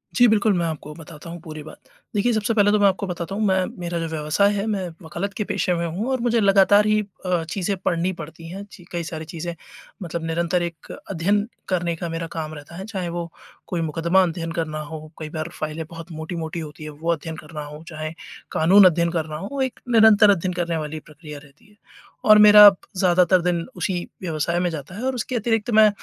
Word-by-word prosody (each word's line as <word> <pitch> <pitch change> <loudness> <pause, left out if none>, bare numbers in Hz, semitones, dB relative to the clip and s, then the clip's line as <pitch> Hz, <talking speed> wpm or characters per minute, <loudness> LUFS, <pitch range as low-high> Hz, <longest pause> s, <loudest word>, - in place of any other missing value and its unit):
जी, 245 -1 +6
बिल्कुल 215 -1 +3
मैं 170 - 0
आपको 150 -2 -5
बताता 160 0 -11
हूँ 170 0 -7
पूरी 155 -2 -8
बात। - - -11 0.4
देखिए 235 +4 +2
सबसे 215 +1 0
पहले 205 -1 +4
तो 210 - +3
मैं 200 - +5
आपको 195 +1 0
बताता 175 +2 -4
हूँ 215 - -1
मैं 190 -1 +2
मेरा 170 -1 -3
जो 165 - -2
व्यवसाय 160 +6 +1
है, 200 +1 -2
मैं 195 -4 -1 0.2
वकालत 200 +5 -4
के 210 - -2
पेशे 180 -2 0
में 170 0 -1
हूँ 190 +10 -3
और 260 - 0
मुझे 235 -1 +2
लगातार 200 +1 +5
ही 215 0 +3 0.3
अ, 175 -2 +1
चीज़ें 190 +4 -2
पढ़नी 180 0 0
पड़ती 165 +1 -9
हैं 195 +3 -7
चि 180 - -13
कई 170 -1 -2
सारी 160 -1 -6
चीज़ें 170 +1 -5 0.5
मतलब 170 -1 -4
निरंतर 170 +2 0
एक 170 -2 -7 0.2
अध्ययन 200 +4 +1 0.2
करने 175 -2 0
का 170 0 -5
मेरा 165 0 -4
काम 155 -1 -5
रहता 145 +2 -11
है 190 +2 -6
चाहे 190 -5 -4
वो 170 0 -4 0.4
कोई 175 -2 -2
मुकदमा 165 +4 +2
अध्ययन 165 -1 -3
करना 155 -2 -3
हो, 155 +1 -8
कई 155 -1 -6
बार 155 +1 -4
फाइलें 155 +1 -4
बहुत 165 0 -10
मोटी-मोटी 160 +1 -5
होती 155 -1 -8
है, 155 - -6
वो 160 +3 -2
अध्ययन 160 0 -3
करना 150 -1 -8
हो 150 +2 -10
चाहे 155 -1 -5 0.4
कानून 190 +5 +6
अध्ययन 170 -1 +4
करना 160 -3 -3
हो, 265 - -4
एक 260 -2 -2
निरंतर 220 -2 +7
अध्ययन 185 -2 +2
करने 170 -2 -1
वाली 155 0 -4
प्रक्रिया 150 -1 -11
रहती 150 +8 -21
है। 210 - -23 0.5
और 215 0 +8
मेरा 210 0 +10 0.3
ज़्यादातर 180 0 +4
दिन 170 -1 0
उसी 190 -4 -1 0.3
व्यवसाय 170 0 -1
में 175 -1 +1
जाता 160 +2 -7
है 230 - -6
और 265 -1 0
उसके 250 +1 -3
अतिरिक्त 225 0 0
मैं 215 -1 +8
170 Hz, 215 wpm, -23 LUFS, 160-200 Hz, 0.5 s, मेरा